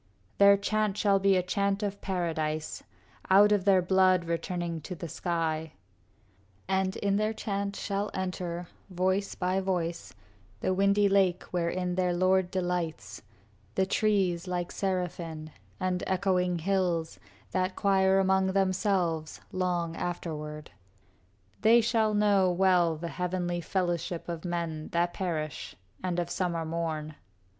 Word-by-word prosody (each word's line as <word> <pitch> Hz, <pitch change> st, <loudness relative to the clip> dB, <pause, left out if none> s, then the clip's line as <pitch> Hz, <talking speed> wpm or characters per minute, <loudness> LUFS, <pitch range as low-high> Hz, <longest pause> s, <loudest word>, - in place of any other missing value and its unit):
Their 200 Hz, 0 st, +7 dB
chant 210 Hz, 0 st, 0 dB
shall 200 Hz, -2 st, +3 dB
be 195 Hz, 0 st, +4 dB
a 180 Hz, -, +1 dB
chant 200 Hz, +2 st, 0 dB
of 200 Hz, -1 st, -3 dB
paradise, 160 Hz, -4 st, -2 dB, 0.5 s
Out 200 Hz, +2 st, +7 dB
of 205 Hz, -3 st, +2 dB
their 190 Hz, -2 st, +5 dB
blood, 185 Hz, -1 st, +3 dB
returning 170 Hz, 0 st, -3 dB
to 180 Hz, +4 st, -6 dB
the 170 Hz, -, -6 dB
sky; 160 Hz, -1 st, -2 dB, 0.9 s
And 190 Hz, 0 st, 0 dB
in 200 Hz, -1 st, 0 dB
their 215 Hz, +1 st, 0 dB
chant 200 Hz, -2 st, -3 dB
shall 200 Hz, 0 st, -2 dB
enter, 180 Hz, -2 st, -4 dB, 0.2 s
voice 190 Hz, +2 st, 0 dB
by 185 Hz, +1 st, 0 dB
voice, 170 Hz, -, -2 dB, 0.5 s
The 185 Hz, -, 0 dB
windy 200 Hz, +2 st, +3 dB
lake 195 Hz, -3 st, +2 dB
wherein 180 Hz, +1 st, -1 dB
their 180 Hz, -1 st, +1 dB
lord 185 Hz, 0 st, +2 dB
delights, 175 Hz, -, -3 dB, 0.5 s
The 190 Hz, -, +2 dB
trees, 190 Hz, -4 st, +1 dB
like 175 Hz, -1 st, -2 dB
serafin, 170 Hz, -4 st, -3 dB, 0.3 s
and 185 Hz, -1 st, -1 dB
echoing 180 Hz, -2 st, +1 dB
hills, 175 Hz, -2 st, -1 dB, 0.3 s
That 185 Hz, 0 st, 0 dB
choir 190 Hz, -1 st, +3 dB
among 190 Hz, 0 st, +3 dB
themselves 185 Hz, -4 st, 0 dB
long 175 Hz, -3 st, -1 dB
afterward. 150 Hz, -, -5 dB, 0.9 s
They 225 Hz, +2 st, +6 dB
shall 225 Hz, -2 st, +2 dB
know 200 Hz, -3 st, +4 dB
well 175 Hz, -2 st, +3 dB
the 170 Hz, +2 st, -5 dB
heavenly 175 Hz, +1 st, -2 dB
fellowship 175 Hz, -1 st, -2 dB
Of 170 Hz, 0 st, -5 dB
men 170 Hz, -3 st, -3 dB
that 175 Hz, +1 st, +1 dB
perish 155 Hz, -6 st, -4 dB, 0.3 s
and 180 Hz, -1 st, -1 dB
of 175 Hz, 0 st, -3 dB
summer 170 Hz, -3 st, -1 dB
morn. 160 Hz, -2 st, -3 dB
180 Hz, 130 wpm, -29 LUFS, 170-195 Hz, 0.9 s, Their